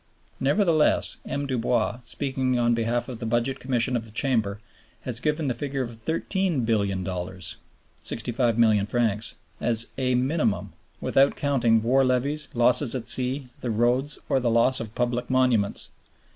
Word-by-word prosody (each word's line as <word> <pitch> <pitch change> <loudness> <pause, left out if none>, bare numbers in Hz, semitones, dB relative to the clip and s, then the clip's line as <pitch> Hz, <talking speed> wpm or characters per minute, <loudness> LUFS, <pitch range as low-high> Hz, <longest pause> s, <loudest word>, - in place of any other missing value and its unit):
Nevertheless, 155 +2 +2
M. 140 0 -2
Dubois, 120 -3 0
speaking 130 -2 -1
on 120 0 +2
behalf 115 +1 -1
of 125 -3 -7
the 115 - -5
Budget 120 +4 0
Commission 125 0 0
of 115 - -1
the 110 - -12
Chamber, 110 -4 -1 0.4
has 120 -1 -1
given 150 +2 -1
the 125 - +1
figure 135 +2 -3
of 120 - -6
$13,000,000,000 100 - -2 0.5
(65 120 0 -1
milliard 105 -3 +3
francs) 110 -2 0 0.2
"as 115 0 +1
a 125 -1 +1
minimum" 130 -3 0 0.3
without 135 +1 +3
counting 120 -6 +2
"war 130 +3 +3
levies, 135 +4 +1
losses 120 +2 +4
at 120 -2 -4
sea, 130 +2 0
the 125 - -4
roads, 120 +6 +1
or 135 - +2
the 120 -2 0
loss 115 +3 +3
of 110 -1 -7
public 120 0 -1
monuments." 125 -6 +1
120 Hz, 145 wpm, -25 LUFS, 115-135 Hz, 0.5 s, losses